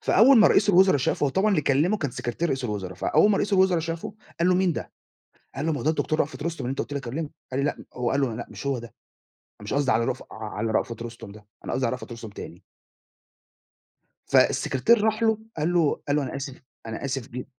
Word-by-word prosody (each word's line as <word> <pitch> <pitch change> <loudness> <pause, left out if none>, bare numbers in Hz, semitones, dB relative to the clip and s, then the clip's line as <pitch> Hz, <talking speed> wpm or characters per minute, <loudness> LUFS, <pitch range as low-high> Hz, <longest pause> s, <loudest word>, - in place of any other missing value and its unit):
فأول 245 +5 +6
ما 215 - +7
رئيس 210 - +3
الوُزَرا 185 -3 +6
شافه، 135 +2 0
هو 140 - +1
طبعًا 195 +9 +2
اللي 185 -6 +3
كلّمه 150 +10 +2
كان 145 -7 -2
سكرتير 125 +8 -3
رئيس 130 -3 -2
الوُزَرا، 100 -5 -4
فأول 205 - +3
ما 200 - +3
رئيس 205 - -1
الوُزَرا 190 -3 +4
شافه، 165 +3 -5 0.3
قال 170 - +3
له: 185 - +4
"مين 185 -1 +2
ده؟" - - -6 0.6
قال 140 +3 -3
له: 165 - +1
"ما 145 - -2
هو - - -5
ده 155 - +4
الدكتور 155 0 -1
رأفت 150 0 -2
رُستُم 165 -4 -3
اللي 125 - -2
أنت 135 - -4
قُلت - - -3
لي 140 - -1
أكلّمه." 140 +4 -5 0.2
قال 130 - 0
لي 140 - +1
لأ - - -3
هو 125 -1 -1
قال 140 - +1
له: 130 -5 0
"لأ، 120 - -6
مش - - -8
هو 135 -3 0
ده 120 0 -10 0.7
مش 105 - -4
قصدي 140 -1 +2
على 115 +1 +2
رف 125 - -2
على 110 0 -4
رأفت 115 +1 -1
رُستُم 115 -3 -9
ده، 105 0 -15 0.2
أنا - - -4
قصدي 130 -1 0
على 115 - -1
رأفت 125 -1 -6
رُستُم 115 -1 -8
تاني." 95 -3 -10 1.7
فالسكرتير 210 - +3
راح 220 +1 +1
له 220 -1 +3 0.2
قال 160 +3 0
له 165 -4 +2
قال 145 - +2
له: 150 - +1
"أنا 135 0 -4
آسف 135 -1 -7 0.2
أنا 110 +3 -6
آسف 135 -3 -3
ج" 125 +1 -6
140 Hz, 240 wpm, -25 LUFS, 120-170 Hz, 1.7 s, ما